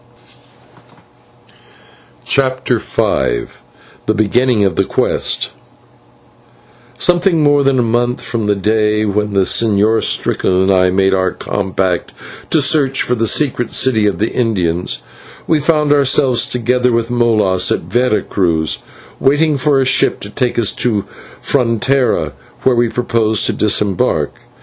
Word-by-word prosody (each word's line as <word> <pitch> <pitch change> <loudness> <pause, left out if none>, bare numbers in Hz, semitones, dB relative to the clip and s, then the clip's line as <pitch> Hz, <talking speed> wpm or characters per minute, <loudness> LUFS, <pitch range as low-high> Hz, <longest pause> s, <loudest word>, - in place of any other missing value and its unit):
CHAPTER 130 -3 0
V - - -1 0.6
THE - - +2
BEGINNING 110 +2 +1
OF 95 -3 +1
THE - - +2
QUEST - - -1 1.5
Something 175 -1 +2
more 145 -1 +3
than 135 -1 +2
a 125 - +2
month 120 +2 0
from 115 -3 -4
the 105 0 +1
day 105 +1 0
when 105 0 -1
the 100 - +2
Señor 110 +2 +2
Strickland 90 - 0
and 95 +1 +2
I 90 -1 +3
made 95 +1 +1
our 95 -1 +1
compact 95 -1 -3 0.3
to 155 - +2
search 135 -1 +2
for 125 - -1
the 115 -2 0
secret 125 -1 0
city 110 -5 +2
of 100 -4 -1
the 110 +4 -1
Indians, 90 -8 -2 0.4
we 160 - +1
found 150 -1 +2
ourselves, 135 -3 +2
together 125 +1 0
with 115 0 -1
Molas, 110 -6 +1
at - - 0
Vera 110 +6 0
Cruz, 80 -5 -1 0.4
waiting 145 +3 +2
for 140 0 +1
a 135 - +1
ship 135 +1 +2
to 100 - -8
take 125 +1 -2
us 115 -4 +2
to 105 -5 -2 0.3
Frontera, 125 - 0 0.3
where 130 -1 +3
we 120 -1 +1
proposed 115 -2 0
to - - +1
disembark. 105 -3 0
115 Hz, 135 wpm, -15 LUFS, 100-130 Hz, 1.5 s, more